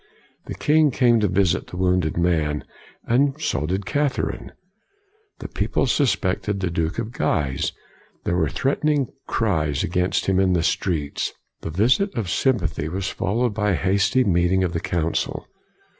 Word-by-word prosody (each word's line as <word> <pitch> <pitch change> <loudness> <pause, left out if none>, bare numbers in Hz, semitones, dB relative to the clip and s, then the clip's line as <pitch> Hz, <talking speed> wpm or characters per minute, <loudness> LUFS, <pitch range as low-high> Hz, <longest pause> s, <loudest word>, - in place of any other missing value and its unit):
The - - -5
king 155 0 +3
came 120 -3 +3
to 105 - +2
visit 95 -1 +1
the 90 - -8
\vounded 90 -4 +1
man, 80 -4 +1 0.4
and 135 +4 +2
so 75 - -1
did 95 +3 -2
Cath 145 0 0
erine. - - -3 0.9
The - - -7
people - - -1
suspected 100 -7 0
the 90 -2 -1
Duke 85 +1 -1
of 110 - -3
Guise. 70 - -1 0.5
There 85 - 0
were 80 -4 +1
threatening 140 - 0 0.2
cries 80 -11 0
against 90 +1 0
him 95 -1 +2
in 95 -1 +3
the 85 -2 +1
streets. 80 -6 -1 0.3
The - - -5
visit 125 - +2
of 110 -8 -2
sympathy 85 - 0
was 95 +2 -3
followed 110 +4 -1
by 105 -1 +1
a - - +2
hasty 100 +8 +2
meeting 95 -1 +2
of 90 -2 -1
the 85 - -1
Council. 85 -1 -2
95 Hz, 160 wpm, -23 LUFS, 85-120 Hz, 0.9 s, king